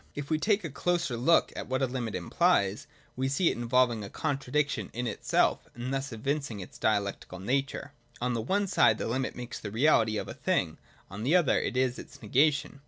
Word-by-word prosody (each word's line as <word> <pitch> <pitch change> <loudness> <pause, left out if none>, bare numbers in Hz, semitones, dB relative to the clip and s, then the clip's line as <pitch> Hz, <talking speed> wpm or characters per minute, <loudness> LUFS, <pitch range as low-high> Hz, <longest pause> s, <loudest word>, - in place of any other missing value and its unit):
If 145 +1 -6
we 155 - +2
take 205 +4 +2
a 165 - -5
closer 170 -2 0
look 140 +9 +3
at - - -5
what 130 +1 0
a - - +5
limit 125 -4 -3
implies, 110 - +1 0.3
we 130 +1 -1
see 165 +6 +2
it - - -4
involving 120 -1 +2
a 100 - -7
contradiction 140 +1 -1
in 120 +2 -3
itself, 110 - +1
and 120 +3 -4
thus 135 0 -2
evincing 135 0 -3
its 90 - -10
dia 110 -1 +3
lectical 100 -2 -7
nature. 135 +6 -2 0.3
On 125 0 -1
the 115 - -1
one 200 - 0
side 110 - +4
the - - -3
limit 130 +3 -2
makes 125 0 -6
the 105 - -6
reality 115 -2 +3
of - - -4
a - - -6
thing; - - -1 0.3
on 100 +2 -6
the 140 +10 +2
other 175 -6 +4
it - - -2
is 130 -1 +1
its - - -11
negation. 140 +5 +1
130 Hz, 210 wpm, -29 LUFS, 115-145 Hz, 0.3 s, a